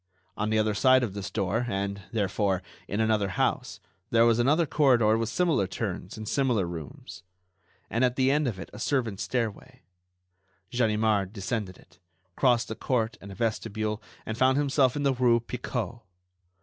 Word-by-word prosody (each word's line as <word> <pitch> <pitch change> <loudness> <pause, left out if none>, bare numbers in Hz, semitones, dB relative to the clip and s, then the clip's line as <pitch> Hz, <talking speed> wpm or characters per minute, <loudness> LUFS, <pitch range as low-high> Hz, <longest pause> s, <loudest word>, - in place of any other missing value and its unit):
On 105 +1 -1
the 110 - +2
other 110 0 +2
side 130 +4 +4
of 105 -6 -2
this 100 -1 -5
door 110 +4 -1
and, 100 -1 -2
therefore, 100 -3 0 0.2
in 100 - -3
another 110 -2 +2
house - - 0 0.3
there 115 0 +5
was 115 0 +3
another 150 +7 +3
corridor 125 -8 +4
with 115 0 -1
similar 160 - +1
turns - - -5
and 110 0 -7
similar 125 -8 +1
rooms, 80 -2 -8 0.7
and 115 +3 0
at 125 -1 +2
the 130 0 +3
end 150 0 +2
of 110 -6 -2
it 85 - -9
a 105 - -9
servants' 115 -7 -1
stairway. 120 +4 -3 0.9
Ganimard 110 -4 +1
descended 100 -2 -3
it, - - -22 0.4
crossed 120 -5 +2
a - - -3
court 115 -2 -1
and 100 - -9
a - - -9
vestibule 110 -1 -2 0.2
and 110 +2 -5
found 130 +1 +4
himself 140 -3 +2
in 145 - -2
the 140 -1 +3
rue 120 -2 +3
Picot. 120 0 -4
115 Hz, 170 wpm, -27 LUFS, 105-125 Hz, 0.9 s, there